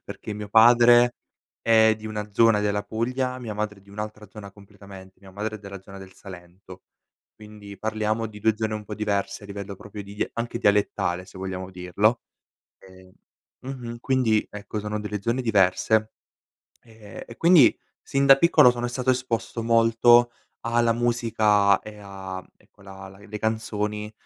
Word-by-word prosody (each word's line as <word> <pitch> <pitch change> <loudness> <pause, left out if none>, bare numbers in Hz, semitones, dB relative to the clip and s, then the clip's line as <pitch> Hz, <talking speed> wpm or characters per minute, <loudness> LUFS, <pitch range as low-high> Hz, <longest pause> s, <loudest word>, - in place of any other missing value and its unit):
perché 105 - -8
mio 105 0 -7
padre 120 +2 +6 0.5
è 110 -1 +4
di 110 0 -10
una 105 -1 -5
zona 115 0 +4
della 105 0 -1
Puglia, 125 +3 -3
mia 115 -3 -6
madre 105 -1 -4
è - - -24
di 100 - -20
un'altra 105 0 -7
zona 100 -1 -11
completamente. 100 -2 -15
Mia 95 0 -16
madre 105 +2 -4
è - - -14
della 100 -2 -10
zona 100 0 -12
del 95 -1 -12
Salento, 90 0 -13 0.5
quindi 105 -1 -12
parliamo 110 +1 -2
di 105 - -12
2 110 +1 +2
zone 110 -1 -2
un 105 0 -6
po' 105 - -7
diverse 105 -1 -2
a - - -10
livello 100 0 -7
proprio 105 +1 -10
di 100 +1 -3
anche 115 0 -4
dialettale, 100 -3 0
se 95 - -15
vogliamo 95 -1 -5
dirlo. 90 +6 0 0.6
E 95 0 -18 0.5
mh-mh. 125 -3 -7
Quindi 120 -5 +1
ecco, 105 +1 -6
sono 105 +1 -4
delle 105 -1 -5
zone 115 +5 -1
diverse 110 0 +2 0.7
e 110 -4 -12
e 115 - -11
quindi 165 -6 +5 0.3
sin 140 0 +1
da 135 0 +8
piccolo 135 -4 +5
sono 120 0 -3
stato 125 +1 -5
esposto 125 -2 -1
molto 115 +1 +4 0.4
alla 115 0 +2
musica 110 -4 +2
e 105 -1 -11
a, 95 -2 -8
ecco, 100 - -25
la 95 0 -11
la 95 - -15
le 105 +1 -9
canzoni, 105 -1 -3
105 Hz, 165 wpm, -24 LUFS, 100-115 Hz, 0.7 s, da